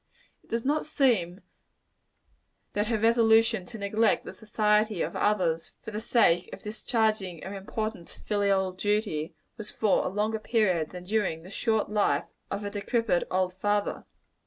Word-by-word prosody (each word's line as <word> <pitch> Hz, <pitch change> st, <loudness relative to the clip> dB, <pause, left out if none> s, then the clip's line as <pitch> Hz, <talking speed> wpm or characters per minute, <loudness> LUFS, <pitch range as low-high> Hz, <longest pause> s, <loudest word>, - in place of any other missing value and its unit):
It -, -, -27 dB
does 230 Hz, +1 st, -2 dB
not 295 Hz, +2 st, +1 dB
seem 215 Hz, -, +1 dB, 1.3 s
that 210 Hz, +1 st, 0 dB
her 225 Hz, -1 st, +1 dB
resolution 225 Hz, -2 st, +4 dB
to 235 Hz, -, -9 dB
neglect 210 Hz, +1 st, +1 dB
the -, -, -7 dB
society 210 Hz, -2 st, +1 dB
of -, -, -4 dB
others 180 Hz, -6 st, 0 dB
for -, -, -7 dB
the 210 Hz, +1 st, -4 dB
sake 215 Hz, -7 st, +3 dB
of -, -, -9 dB
discharging 215 Hz, -5 st, -1 dB
an 190 Hz, -, -6 dB
important 200 Hz, -1 st, -5 dB
filial 200 Hz, -2 st, +1 dB
duty, 190 Hz, -5 st, -1 dB, 0.2 s
was 215 Hz, -2 st, -3 dB
for 215 Hz, -3 st, +2 dB
a -, -, -1 dB
longer 210 Hz, +3 st, -1 dB
period, 190 Hz, -9 st, +1 dB
than 180 Hz, -1 st, -9 dB
during 190 Hz, -5 st, -1 dB
the 185 Hz, -, -12 dB
short 220 Hz, -1 st, 0 dB
life 210 Hz, -1 st, +2 dB, 0.2 s
of 200 Hz, -, -3 dB
a 205 Hz, -, -4 dB
very 205 Hz, -, -4 dB
decrepid 230 Hz, -4 st, +1 dB
old 185 Hz, 0 st, 0 dB
father. 205 Hz, +2 st, -1 dB
210 Hz, 160 wpm, -28 LUFS, 190-220 Hz, 1.3 s, resolution